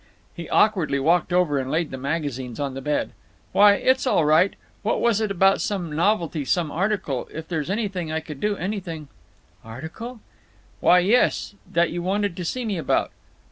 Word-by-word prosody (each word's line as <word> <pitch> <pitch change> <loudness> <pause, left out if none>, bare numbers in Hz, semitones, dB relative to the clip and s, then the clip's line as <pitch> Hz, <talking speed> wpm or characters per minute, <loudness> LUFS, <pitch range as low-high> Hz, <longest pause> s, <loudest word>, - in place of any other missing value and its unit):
He 170 -2 -8
awkwardly 185 -10 +2
walked 170 +6 +2
over 175 -6 +2
and 130 0 -4
laid 160 +2 -1
the - - -4
magazines 135 -4 -3
on 140 -2 -2
the 135 - -6
bed. 150 +2 -1 0.4
"Why, 205 0 +7
it's 260 +5 +1
all 170 -10 +3
right…. 155 +6 +4 0.3
What 210 - 0
was 230 -2 +2
it 215 - 0
about 195 0 +3
some 175 -7 -3
novelty—some 165 -4 0
article? 185 - -1
If 160 0 -7
there's 160 -2 -3
anything 195 -6 -2
I 160 - 0
could 150 -3 -9
do—anything—" 185 -6 -3 0.5
"Article?" 160 - -8 0.6
"Why, 180 - +5
yes. 210 +2 +2 0.2
That 170 0 +2
you 175 - -3
wanted 200 0 -1
to 180 - -5
see 245 +8 -3
me 200 -5 -2
about." - - 0
175 Hz, 170 wpm, -23 LUFS, 150-200 Hz, 0.6 s, Why